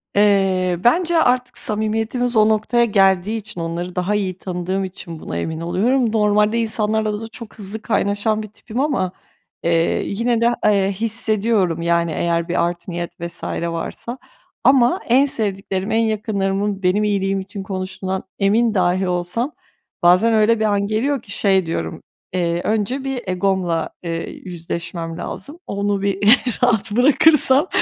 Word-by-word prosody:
Eee, 190 -3 +3
bence 335 +7 +3
artık 250 -1 +1
samimiyetimiz 225 +3 -1
o 215 0 +5
noktaya 220 +2 +2
geldiği 195 0 +2
için, 210 -5 -7
onları 170 +2 -4
daha 185 +3 0
iyi 190 -3 -2
tanıdığım 185 +1 -3
için 180 -3 -8
buna 85 - -5
emin 160 - -3
oluyorum. 220 +8 +1
Normalde 210 +1 +2
insanlarla 215 -1 -1
da 225 - -5
çok 230 -1 -10
hızlı 215 +1 -5
kaynaşan 215 0 0
bir - - -7
tipim 220 +3 -7
ama, 260 -11 0 0.5
eee, 165 0 +1
yine 230 +3 0
de, 235 +1 +3
eee, 200 -2 +3
hissediyorum, 215 -4 0
yani, 170 -1 +1
eğer 170 +1 0
bir 170 -1 +2
art 175 +1 -5
niyet 175 -1 -4
vs. 170 0 -7 0.3
varsa 235 +8 -5 0.5
ama 255 -3 +4
en 260 +4 +5
sevdiklerim, 195 -5 -3
en 220 - +2
yakınlarımın 205 -2 -1
benim 185 +3 +2
iyiliğim 195 -2 0
için 195 +1 -7
konuştuğundan 190 0 -4 0.2
emin 215 +3 +3
dahi 185 -1 +1
olsam 180 - -1 0.5
bazen 185 +7 +5
öyle 220 +1 +3
bir 220 - +1
an 200 -1 +1
geliyor 250 +5 0
ki 200 - -13
şey 190 -3 +2
diyorum, 165 - -4 0.3
eee, 175 -1 0
"Önce 220 +5 -1
bir 270 -2 -3
egomla, 185 -3 0
eee, 165 -1 -3
yüzleşmem 170 -1 -6
lazım 280 - -7
onu 200 0 -1
bir 200 -1 0 0.5
rahat 225 -4 +2
bırakırsam 280 - +4
200 Hz, 145 wpm, -20 LUFS, 180-225 Hz, 0.5 s, o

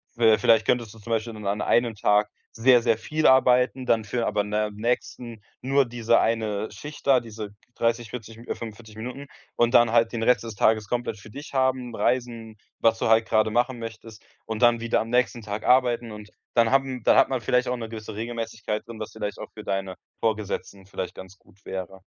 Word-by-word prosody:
w 110 -2 +5
vielleicht 110 +2 +4
könntest 115 -3 0
du 110 - -15
zum 115 +3 -9
Beispiel 115 +1 -1
dann 105 -2 -7
an 100 +1 -1
einem 120 -2 +2
Tag 105 0 +2 0.2
sehr, 120 +1 +5
sehr 115 -2 +2
viel 155 +7 -2
arbeiten, 130 0 +4
dann 115 -2 +2
für 115 +2 -2
aber 105 - +1
in 105 0 -6
der 105 0 0
nächsten 115 +1 -3 0.2
nur 135 +1 +2
diese 115 -1 +2
1 110 -2 -1
Schicht 145 +9 -10
da, 130 -3 +5
diese 110 -3 -8 0.2
30, 115 0 0
40, 115 -2 -8
äh, 115 - -12
45 110 -1 -7
Minuten 125 +5 -7 0.3
und 120 +1 +2
dann 120 -2 +6
halt 115 -1 +4
den 115 - -4
Rest 125 +1 +3
des 115 -2 -7
Tages 110 0 +2
komplett 120 -3 -2
für 105 - -13
dich 140 +6 -10
haben, 130 -3 0
reisen, 115 -3 -2 0.2
was 115 0 +3
du - - 0
halt 110 0 +4
grade 110 0 +2
machen 120 +2 0
möchtest 115 -1 -9 0.2
und 110 +1 -5
dann 120 -1 +4
wieder 115 - +1
am 115 - -3
nächsten 120 -2 +1
Tag 105 0 -5
arbeiten. 120 -2 +3
Und 105 0 -10 0.2
dann 115 -1 +3
haben 135 -3 +1
dann - - +5
hat - - +5
man 130 -1 -1
vielleicht 125 +2 +1
auch 125 - -1
'ne 115 -2 -5
gewisse 110 -1 -8
Regelmäßigkeit 110 -1 -4
drin, 115 -1 -10
was 110 - -6
vielleicht 105 -2 -5
auch - - -7
für 105 - -10
deine 95 -2 -3 0.2
Vorgesetzten 105 -3 -3
vielleicht 95 -1 -6
ganz 95 +1 -11
gut 100 +3 -26
wäre. 95 0 -6
115 Hz, 210 wpm, -25 LUFS, 110-120 Hz, 0.3 s, dann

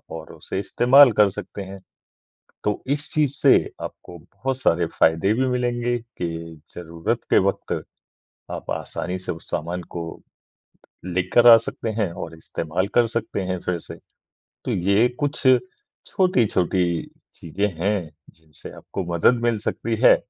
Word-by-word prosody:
और 80 -1 -9
उसे - - -5
इस्तेमाल 125 +6 +6
कर 105 -1 +6
सकते 100 +1 -7
हैं। 95 0 -9 0.8
तो 105 - -1
इस 150 0 -4
चीज़ 150 -3 +2
से - - +5 0.3
आपको 85 - -8
बहुत 100 +11 -5
सारे 85 -5 +2
फ़ायदे 80 +6 +3
भी 130 +3 +1
मिलेंगे 120 -1 0 0.2
कि 85 -2 -5 0.2
ज़रूरत 85 -1 -3
के - - +5
वक़्त - - -2 0.8
आप - - -6
आसानी 90 +2 -3
से 90 - -4
उस 80 - -10
सामान 85 +3 -3
को 85 - -3 1.0
लेकर 95 +6 +3
आ 115 - +11
सकते 115 - -4
हैं 100 -5 0
और 80 - -7
इस्तेमाल 85 +4 -3
कर 120 -1 +5
सकते 105 - -3
हैं 90 - -2
फिर 90 - 0
से - - -6 0.7
तो - - -1
ये 100 +6 +3
कुछ 145 0 -1 0.7
छोटी-छोटी 110 - +2 0.5
चीज़ें 95 +5 -2
हैं, 95 -3 0 0.3
जिनसे 80 -2 -12
आपको 95 - -6
मदद 115 +8 +3
मिल 120 -2 +2
सकती 115 +2 -2
है - - +8
100 Hz, 145 wpm, -23 LUFS, 85-120 Hz, 1.0 s, आ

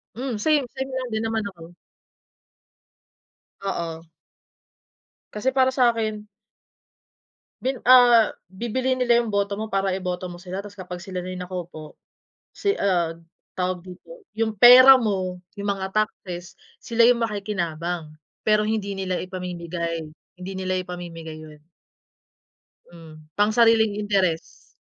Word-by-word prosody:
Hmm, 250 0 -3
same 290 +2 +2
same 265 0 -4
lang 260 -1 -3
din 220 0 -1
naman 225 -1 -1
ako. 165 0 -13 1.9
Oo. 170 -4 -4 1.3
Kasi 210 +5 0
para 260 -1 +4
sa'kin 225 -4 0 1.3
Bin 260 0 -1
ah, 245 -3 +7 0.2
bibilhin 250 +6 -2
nila 240 -2 +3
yung 235 - -4
boto 200 -1 0
mo 215 +2 -4
para 195 -2 0
iboto 180 -1 -3
mo 175 -1 -8
sila, 190 +2 -6
tas 205 - -10
kapag 180 -2 -8
sila 180 +1 -6
na 180 - -7
yung 180 0 -5
nakaupo, 175 -4 -8 0.6
si 400 -1 -1
ah, 175 -4 0 0.4
tawag 180 -1 -1
dito 190 - -13 0.2
yung 220 0 0
pera 255 +5 +9
mo, 185 -5 -2 0.2
yung 200 0 -4
mga 190 -1 -4
taxes, 190 -3 -4 0.2
sila 230 0 +3
yung 240 -1 +3
makikinabang, 175 -6 -3 0.3
pero 215 0 +3
hindi 210 -2 -1
nila 190 -2 -2
ipamimigay, 170 -3 -4 0.3
hindi 185 +2 -7
nila 185 0 -1
ipamimigay 170 -3 -7
yun. 155 -1 -13 1.3
Hmm, 160 -2 -13 0.2
pangsariling 220 0 +4
interes, 190 -5 -1
195 Hz, 125 wpm, -24 LUFS, 180-225 Hz, 1.9 s, pera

